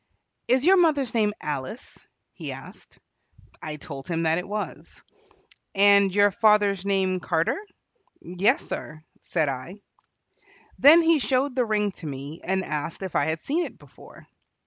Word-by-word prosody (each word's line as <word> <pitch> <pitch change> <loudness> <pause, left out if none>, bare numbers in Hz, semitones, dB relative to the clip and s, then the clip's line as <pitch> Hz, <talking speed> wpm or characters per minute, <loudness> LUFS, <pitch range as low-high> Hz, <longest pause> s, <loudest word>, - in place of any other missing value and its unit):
"Is 255 +3 +2
your 380 +2 +6
mother's 295 -8 +2
name 215 -3 +2
Alice?" 140 -4 -6 0.3
he - - -7
asked. - - -13 0.6
I 155 -1 -5
told 140 -3 -9
him 165 -1 -2
that 160 +1 +2
it 180 - -7
was. 210 +1 -6 0.7
"And 200 0 +5
your 205 +1 +4
father's 205 -2 +3
name 190 -2 +1
Carter?" 165 - -1 0.6
"Yes, 180 +4 0
sir," 155 0 -7 0.2
said 160 -4 -1
I. 135 +7 -5 1.0
Then 320 +5 +8
he 325 -1 +4
showed 260 0 0
the 250 -2 +1
ring 210 -2 0
to 165 - -8
me 140 +3 -7
and 190 0 -1
asked 150 +4 -4
if 190 - -6
I - - +2
had 160 0 -2
seen 325 +5 -1
it - - -8
before. - - -16
195 Hz, 150 wpm, -25 LUFS, 160-235 Hz, 1.0 s, Then